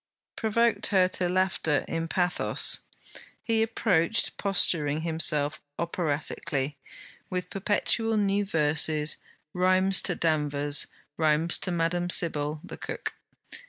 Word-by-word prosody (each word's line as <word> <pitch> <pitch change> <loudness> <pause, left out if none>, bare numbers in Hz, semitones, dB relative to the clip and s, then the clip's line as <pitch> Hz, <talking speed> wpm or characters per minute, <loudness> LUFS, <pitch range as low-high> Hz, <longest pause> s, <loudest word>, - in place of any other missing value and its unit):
provoked 230 +1 +1
her 185 -3 +3
to 185 -1 -2
laughter 180 -5 0
in 165 0 -3
pathos. 180 +1 +3 0.6
He 225 -1 0
approached, 220 -3 0
posturing 160 -6 +1
himself 160 -3 +1 0.2
operatically, 155 -3 -3 0.6
with 180 -1 -4
perpetual 215 +3 0
new 200 0 +1
verses, 155 -3 +2 0.4
rhymes 185 +1 +3
to 180 - -2
Danvers, 145 -3 0 0.3
rhymes 160 +1 +2
to 185 - -4
Madame 175 +1 -1
Sybille, 150 -3 +1
the - - -9
cook. - - -6
170 Hz, 105 wpm, -27 LUFS, 155-190 Hz, 0.6 s, her